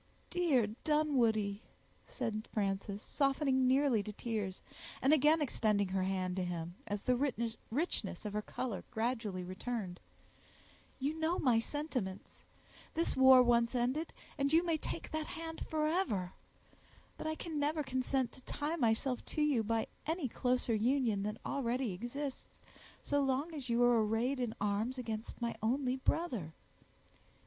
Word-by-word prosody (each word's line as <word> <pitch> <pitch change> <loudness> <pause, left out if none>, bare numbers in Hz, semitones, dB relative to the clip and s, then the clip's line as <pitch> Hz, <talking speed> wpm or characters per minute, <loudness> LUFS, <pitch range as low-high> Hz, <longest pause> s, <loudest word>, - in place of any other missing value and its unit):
"Dear 325 -10 +3 0.2
Dunwoodie," 235 -10 +2 0.5
said 225 -3 -3
Frances, 200 0 -2
softening 270 -2 +2
nearly 260 -4 +4
to 210 - -5
tears, 210 -3 -3 0.4
and 275 +3 +4
again 305 +1 +5
extending 210 -7 +1
her 190 0 0
hand 185 -1 -1
to 185 - 0
him, 175 -1 -4
as 205 0 -3
the 250 - +3 0.5
richness 225 - -1
of 210 - -3
her 210 - 0
color 225 -1 -4
gradually 220 -5 -2
returned, 185 0 -4 1.0
"you 280 +3 -1
know 325 +3 +1
my 245 -5 +4
sentiments—this 260 - -4
war 260 -1 +8
once 235 0 +3
ended, 255 +7 0 0.3
and 280 0 +2
you 330 +2 +5
may 335 -2 +2
take - - -5
that 315 0 -2
hand 325 -1 -6
forever—but 305 - -3
I 315 - -1
can 315 -2 -4
never 300 +1 +1
consent 260 -1 0
to - - -15
tie 295 +5 -3
myself 240 0 +1
to 305 - -2
you 285 -6 +3
by 225 +1 0 0.2
any 320 -3 0
closer 250 0 0
union 230 -1 +2
than 210 +2 -2
already 250 -3 0
exists, 255 +8 -5 0.4
so 285 0 +1
long 275 +4 0
as 275 -5 -5
you 235 +1 +3
are 240 -2 +5
arrayed 230 +5 0
in 240 -3 -2
arms 210 +5 0
against 225 -2 -5
my 235 - -1
only 255 +3 +1
brother. 250 - -1
245 Hz, 140 wpm, -34 LUFS, 215-285 Hz, 1.0 s, war